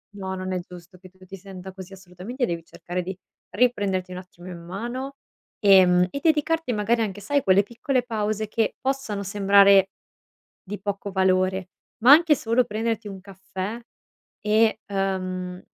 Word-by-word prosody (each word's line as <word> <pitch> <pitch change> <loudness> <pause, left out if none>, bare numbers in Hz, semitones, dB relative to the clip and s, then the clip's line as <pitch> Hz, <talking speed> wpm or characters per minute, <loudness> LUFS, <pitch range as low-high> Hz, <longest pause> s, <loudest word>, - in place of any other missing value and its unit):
No, 190 -1 -5
non 185 0 -4
è 180 - -1
giusto 175 0 -13
che 185 - -14
tu 185 0 -19
ti 190 - -10
senta 190 0 -10
così, 190 0 -11
assolutamente 195 +7 -5
devi 170 -5 -4
cercare 175 +2 -5
di 180 +1 -6 0.3
riprenderti 200 -7 0
un 180 - -6
attimo 180 -1 -12
in 180 -2 -8
mano, 240 +10 -6 0.4
ehm, 185 -3 +6
e 280 - -4
dedicarti 320 -1 +1
magari 225 +1 +1
anche, 205 -2 -3
sai, 285 +8 0
a - - -6
quelle 195 +1 +4
piccole 245 +4 -2
pause 215 -2 -2
che 220 0 -1
possano 260 -7 -2
sembrare 200 -1 +5 0.7
di 205 +1 -7
poco 200 0 -4
valore, 190 -1 +1 0.3
ma 255 +4 +8
anche 315 -1 +6
solo 235 +2 +1
prenderti 225 0 -3
un 195 -1 -8
caffè 195 +3 -7 0.6
e, 215 +1 +2
uhm, 185 -2 -3
195 Hz, 160 wpm, -24 LUFS, 185-225 Hz, 0.7 s, ma